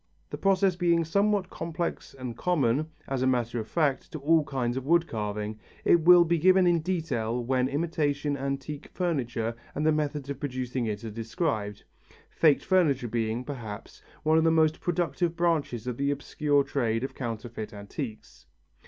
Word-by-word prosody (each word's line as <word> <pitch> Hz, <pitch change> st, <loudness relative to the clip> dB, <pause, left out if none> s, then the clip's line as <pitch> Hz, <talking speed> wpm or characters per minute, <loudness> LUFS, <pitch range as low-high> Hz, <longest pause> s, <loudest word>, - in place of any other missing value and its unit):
The -, -, -4 dB
process 195 Hz, -1 st, +3 dB
being 170 Hz, -2 st, +2 dB
somewhat 200 Hz, +2 st, +1 dB
complex 165 Hz, -2 st, -4 dB
and 130 Hz, -3 st, -6 dB
common, 150 Hz, -3 st, +1 dB, 0.2 s
as 135 Hz, -2 st, -2 dB
a 130 Hz, -, +2 dB
matter 120 Hz, -2 st, 0 dB
of 110 Hz, -, -5 dB
fact, 145 Hz, -4 st, 0 dB
to -, -, -3 dB
all 155 Hz, +2 st, +3 dB
kinds 125 Hz, -3 st, -2 dB
of 130 Hz, -, -3 dB
wood 170 Hz, +1 st, +4 dB
carving, 105 Hz, -3 st, -4 dB, 0.3 s
it 170 Hz, -, +5 dB
will 175 Hz, +1 st, +8 dB
be 170 Hz, 0 st, +1 dB
given 185 Hz, +2 st, +5 dB
in 175 Hz, -1 st, +4 dB
detail 140 Hz, -9 st, -2 dB
when 130 Hz, 0 st, +1 dB
imitation 145 Hz, -1 st, -1 dB
antique 140 Hz, +1 st, -4 dB
furniture 120 Hz, -10 st, -2 dB, 0.2 s
and 150 Hz, -, -1 dB
the 155 Hz, -, +5 dB
methods 150 Hz, -2 st, -1 dB
of 140 Hz, -, -6 dB
producing 130 Hz, -3 st, -3 dB
it 105 Hz, 0 st, -4 dB
are 110 Hz, -, -5 dB
described; 110 Hz, -, -3 dB, 0.5 s
faked 155 Hz, -4 st, +3 dB
furniture 150 Hz, -10 st, +2 dB
being, 115 Hz, +1 st, -1 dB
perhaps, 115 Hz, -7 st, -8 dB, 0.2 s
one 155 Hz, +1 st, +4 dB
of -, -, +2 dB
the 165 Hz, -, +4 dB
most 160 Hz, -1 st, +3 dB
productive 175 Hz, -1 st, 0 dB
branches 160 Hz, -9 st, 0 dB
of 125 Hz, -2 st, -3 dB
the 140 Hz, 0 st, 0 dB
obscure 145 Hz, 0 st, +1 dB
trade 115 Hz, -4 st, -1 dB
of 135 Hz, -, -4 dB
counterfeit 115 Hz, -2 st, -5 dB
antiques. 110 Hz, +3 st, -8 dB
140 Hz, 170 wpm, -28 LUFS, 120-165 Hz, 0.5 s, will